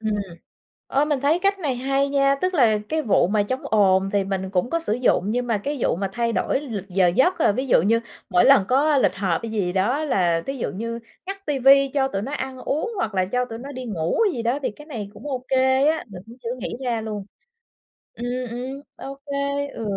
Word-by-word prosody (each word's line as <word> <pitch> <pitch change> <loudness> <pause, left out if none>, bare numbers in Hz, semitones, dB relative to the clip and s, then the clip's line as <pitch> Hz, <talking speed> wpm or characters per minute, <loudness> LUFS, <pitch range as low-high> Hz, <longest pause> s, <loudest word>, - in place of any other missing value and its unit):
Ừm, 220 -1 -1 0.8
ơ, 280 +2 +2
mình 295 -3 0
thấy 295 +5 +2
cách 395 +1 +1
này 285 -7 -1
hay 275 +2 0
nha! 275 0 +3
Tức 370 +6 -1
là 230 -9 +4
cái 315 0 0
vụ 210 - +3
mà 205 +1 +2
chống 255 +6 -3
ồn 195 -2 +3
thì 200 - +2
mình 190 -1 -3
cũng 185 +4 0
có 335 - 0
sử 325 -10 -1
dụng, 245 -5 +2
nhưng 245 +1 -1
mà 230 -3 +1
cái 285 +8 -3
vụ - - +2
mà 195 +2 -2
thay 235 0 0
đổi 205 - 0
lịch 220 -9 -5
giờ 185 0 +3
giấc 315 - +2
là - - +5
ví 260 +6 -3
dụ 245 - +5
như 225 +6 +3 0.3
mỗi 180 -2 +4
lần 190 - +6
có 285 +3 +3
lịch 260 - +2
họp 190 -4 0
hay 230 - -4
gì 195 -5 -1
đó 235 +11 +1
là 175 - +1
thí 270 0 -3
dụ - - -2
như 230 +4 -4 0.3
ngắt 390 +1 -7
ti 290 -2 -1
vi, 275 +2 +6
cho 270 -2 +2
tụi 195 -7 -3
nó 265 - -5
ăn 265 -2 -4
uống, 310 - -2
hoặc 220 - -2
là 185 -1 +2
cho 250 +6 -1
tụi 225 -2 -7
nó 275 +3 -8
đi 255 -2 -6
ngủ 170 -7 -2 0.2
gì 235 - -3
đó 240 +5 0
thì - - 0
cái 295 +8 -14
này 220 -9 -6
cũng 295 - -10
ô 255 -2 -4
kê 265 +1 +3
á, 315 +1 +1
mình 190 -4 -10
cũng 230 +1 -13
chưa 235 +2 -3
nghĩ - - -4
ra 235 -2 0
luôn. 210 -2 -5 0.9
Ừm, 240 - -6 0.2
ừm, 255 +4 -5
ô 275 0 -8
kê, 280 0 -2
ừ. 230 - -7
250 Hz, 245 wpm, -23 LUFS, 205-280 Hz, 0.9 s, lần